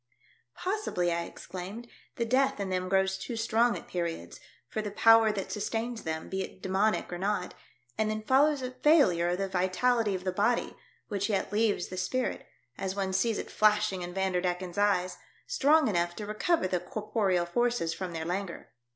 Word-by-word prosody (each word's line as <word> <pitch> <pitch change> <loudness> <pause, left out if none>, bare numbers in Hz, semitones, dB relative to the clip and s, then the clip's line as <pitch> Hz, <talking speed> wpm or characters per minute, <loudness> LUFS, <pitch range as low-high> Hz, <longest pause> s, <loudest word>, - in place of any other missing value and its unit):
" 120 - -36
Possibly," 370 - -1
I 170 0 -1
exclaimed, 190 +9 -8
" - - -32
the 235 - 0
death 265 +1 +2
in 200 -1 -2
them 185 0 -1
grows 190 0 +2
too 240 - -5
strong 230 +1 +2
at - - -11
periods, 170 - -4 0.3
for 215 - -3
the 210 - -4
power 225 +1 +6
that 195 -2 -4
sustains 225 +2 -3
them, 160 0 -4
be 190 0 -3
it 190 - -7
demoniac 190 +1 0
or 175 - -4
not, 195 -1 -1 0.5
and 215 0 +2
then 215 0 -3
follows 275 +3 +3
a 255 - -3
failure 255 - +4
of 175 - 0
the 195 0 -1
vitality 195 +4 +1
of 180 - -5
the 185 - 0
body, 210 +6 0 0.3
which 200 0 -2
yet 200 -1 -1
leaves 210 -4 +1
the 185 - -6
spirit 250 +8 -2 0.2
— 125 - -40
as 190 0 -2
one 190 -1 -2
sees 220 +3 +1
it - - -6
flashing 210 -3 +2
in 175 0 -5
Vander 190 -1 0
decken's 180 +1 -2
eyes 185 -3 +2 0.2
— - - -30
strong 315 - +3
enough 175 -4 0
to 210 - -5
recover 215 - +1
the 180 -1 0
corporeal 205 -4 -1
forces 235 -3 0
from 185 0 -5
their 160 -1 -4
languor. 180 +1 -4
200 Hz, 195 wpm, -29 LUFS, 180-225 Hz, 0.5 s, power